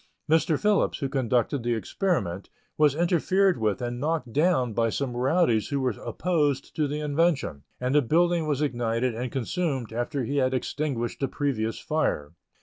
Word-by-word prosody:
Mr. 160 -1 +2
Phillips, 210 -1 +2
who 140 - -2
conducted 130 0 0
the 120 0 0
experiment, 110 - -2 0.3
was 150 -2 +3
interfered 180 +2 +2
with 110 +2 0
and 120 0 -3
knocked 150 -5 -2
down 150 -6 +2
by 115 +1 +1
some 125 +1 -2
rowdies 125 - +2
who 140 - -1
were 130 -1 +1
opposed 150 -6 -1
to 150 -2 +1
the 145 +2 -3
invention, 150 - 0 0.2
and 125 +1 -1
the 150 - +5
building 170 +4 +2
was 150 -1 0
ignited 120 -2 0
and 120 +2 -4
consumed 135 - -2
after 120 +4 -2
he 140 +5 -2
had 130 -1 +2
extinguished 130 -3 -2
the 135 - 0
previous 125 -6 -2
fire. 115 - -1
140 Hz, 165 wpm, -26 LUFS, 120-155 Hz, 0.3 s, the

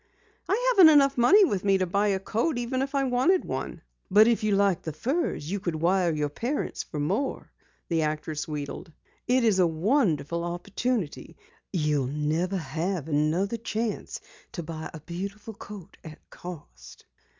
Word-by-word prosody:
"I - - +2
haven't 365 -8 +8
enough 275 -2 +5
money 380 - +6
with 200 - -1
me 195 -1 +3
to 185 - 0
buy 200 +4 +1
a 195 -2 +1
coat 235 - -1
even 245 +2 -1
if 275 +1 -3
I 275 - +2
wanted 265 +9 +2
one." 130 - -5 0.3
"But 210 +3 +6
if 235 -2 +2
you 210 -2 +2
liked 195 -3 +2
the 160 - -5
furs 240 - -2
you 200 - -1
could 175 -3 -3
wire 175 +2 +2
your 150 -2 -1
parents 245 - -3
for 150 - -7
more," 195 - -2 0.4
the 165 -1 +1
actress 155 0 -3
wheedled. 150 +2 -6 0.4
"It 250 +1 +3
is 215 -5 +3
a 180 - +5
wonderful 170 - +1
opportunity. 185 - -3 0.3
You'll 150 -7 0
never 155 +7 -1
have 165 +1 -3
another 160 +8 0
chance 225 0 -3 0.3
to 170 - -5
buy 160 0 -6
a 160 - -10
beautiful 200 +7 -6
coat 200 -2 -11
at 155 -1 -12
cost." 65 - -11
190 Hz, 165 wpm, -27 LUFS, 160-235 Hz, 0.4 s, haven't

